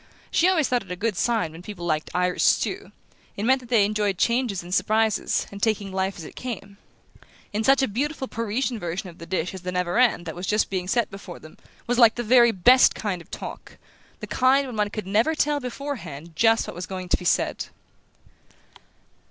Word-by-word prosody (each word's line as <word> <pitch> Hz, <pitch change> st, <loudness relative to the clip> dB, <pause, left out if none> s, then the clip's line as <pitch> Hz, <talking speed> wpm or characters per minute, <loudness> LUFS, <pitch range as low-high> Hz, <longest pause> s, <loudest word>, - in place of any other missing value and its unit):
She 350 Hz, -, +4 dB
always 325 Hz, -6 st, +2 dB
thought 245 Hz, -1 st, +1 dB
it 195 Hz, -, -14 dB
a -, -, -2 dB
good 210 Hz, +3 st, -1 dB
sign 225 Hz, -6 st, 0 dB
when 165 Hz, +2 st, -11 dB
people 180 Hz, -2 st, -8 dB
liked 155 Hz, -2 st, -1 dB
Irish 180 Hz, 0 st, 0 dB
stew; -, -, +1 dB, 0.5 s
it 200 Hz, -, -3 dB
meant 260 Hz, +2 st, +4 dB
that 245 Hz, -2 st, -15 dB
they 225 Hz, -5 st, +4 dB
enjoyed 205 Hz, -2 st, 0 dB
changes 235 Hz, -5 st, 0 dB
and 175 Hz, +1 st, -7 dB
surprises, 220 Hz, +2 st, +1 dB
and 200 Hz, 0 st, -9 dB
taking 210 Hz, -3 st, 0 dB
life 190 Hz, 0 st, -2 dB
as 170 Hz, -, -8 dB
it -, -, -11 dB
came; 200 Hz, -5 st, -7 dB, 0.8 s
and 215 Hz, +2 st, -1 dB
such 270 Hz, +2 st, +4 dB
a -, -, +2 dB
beautiful 265 Hz, +5 st, -2 dB
Parisian 230 Hz, +2 st, -2 dB
version 175 Hz, +2 st, -4 dB
of 165 Hz, -, -20 dB
the 165 Hz, -, -9 dB
dish 180 Hz, 0 st, -2 dB
as 190 Hz, -, -8 dB
the 180 Hz, 0 st, -4 dB
navarin 180 Hz, +4 st, +2 dB
that 165 Hz, -2 st, -6 dB
was 180 Hz, +2 st, -6 dB
just 210 Hz, -1 st, +1 dB
being 185 Hz, -2 st, -2 dB
set 235 Hz, +3 st, 0 dB
before 195 Hz, -3 st, -9 dB
them 155 Hz, -, -14 dB, 0.3 s
was 245 Hz, +1 st, 0 dB
like 230 Hz, -2 st, +7 dB
the 240 Hz, -, -3 dB
very 240 Hz, 0 st, +6 dB
best 245 Hz, +7 st, +5 dB
kind 195 Hz, -5 st, -3 dB
of -, -, -17 dB
talk -, -, -8 dB, 0.4 s
the -, -, -4 dB
kind 265 Hz, +2 st, +3 dB
when 250 Hz, -4 st, -7 dB
one 210 Hz, -1 st, +1 dB
could 215 Hz, -1 st, -5 dB
never 220 Hz, +11 st, +2 dB
tell 295 Hz, -1 st, +1 dB
before 280 Hz, +2 st, -5 dB
hand 160 Hz, -3 st, -10 dB
just 225 Hz, +5 st, +3 dB
what -, -, -6 dB
was 180 Hz, +1 st, -6 dB
going 185 Hz, -1 st, -6 dB
to -, -, +2 dB
be -, -, -10 dB
said! -, -, 0 dB
210 Hz, 215 wpm, -24 LUFS, 180-245 Hz, 0.8 s, like